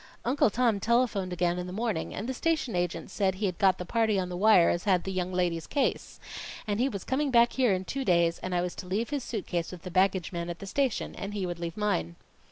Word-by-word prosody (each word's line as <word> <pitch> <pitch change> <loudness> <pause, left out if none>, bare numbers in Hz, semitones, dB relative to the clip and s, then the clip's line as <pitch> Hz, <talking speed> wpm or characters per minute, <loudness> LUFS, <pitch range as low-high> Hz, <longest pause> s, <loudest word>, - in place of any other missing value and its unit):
"Uncle 255 -1 +3
Tom 230 -1 +1
telephoned 220 -4 +1
again 175 0 0
in 180 - -4
the - - -6
morning, 210 -4 -2
and 215 - -5
the 260 - -2
station 310 - 0
agent 175 -1 -2
said 190 -2 +1
he'd 185 -3 -2
got 190 -2 +4
the 180 - -5
party 220 +1 +1
on 180 -1 -2
the 180 - -4
wire 190 -2 +5
as 175 - -2
had 185 -3 +3
the 190 - -4
young 185 -1 -2
lady's 175 -3 -1
case. 285 - -1 0.5
And 205 0 -1
he 260 +3 +2
was 200 -6 -5
coming 280 +2 0
back 235 -1 +5
here 255 -4 +3
in 185 0 0
two 270 +7 -3
days, 170 -5 +2
and 185 -1 -3
I 175 - +2
was 180 - -3
to 180 - -7
leave 215 +8 -1
his 285 -3 -2
suit 215 -6 -4
case 170 -1 -2
with 180 -2 -10
the 185 - -7
baggage 185 -1 +2
man 170 -1 -4
at 170 - -4
the 195 - -8
station, 260 +4 -1
and 200 +1 -6
he 195 -2 -1
would 175 -1 -4
leave 170 +1 -5
mine." 85 - -1
190 Hz, 260 wpm, -28 LUFS, 180-230 Hz, 0.5 s, wire